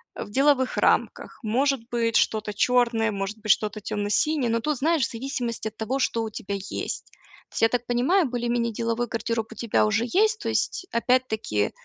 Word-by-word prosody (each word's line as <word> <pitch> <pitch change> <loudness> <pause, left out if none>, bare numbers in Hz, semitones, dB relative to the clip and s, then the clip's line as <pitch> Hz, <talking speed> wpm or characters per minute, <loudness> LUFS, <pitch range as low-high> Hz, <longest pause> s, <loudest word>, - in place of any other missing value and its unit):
а, - - -5
в - - -13
деловых 270 +1 +3
рамках. - - +1
Может 265 +5 +1
быть, 230 -1 0
что-то 215 -1 +1
чёрное, 235 0 +2
может 195 +2 -4
быть, 215 -1 +2
что-то 215 +1 +1
тёмно-синее, 230 +7 0
но 230 0 +1
тут, 300 +4 -1
знаешь, 320 0 +2
в - - -6
зависимости 235 -2 -3
от 215 - -30
того, 255 +5 -2
что 230 -3 0
у 220 - -3
тебя 200 -1 -5
есть. 195 0 -4 0.4
То - - -24
есть, - - -2
я 225 - +5
так 245 0 -1
понимаю, 265 +11 +2
более-менее 235 -1 -1
деловой 230 +2 -1
гардероб 230 -1 -2
у - - -17
тебя 220 -1 +1
уже 215 +2 +1
есть. 430 - +2
То - - -3
есть 370 - -1
опять-таки, 230 - +1
235 Hz, 190 wpm, -25 LUFS, 220-255 Hz, 0.4 s, я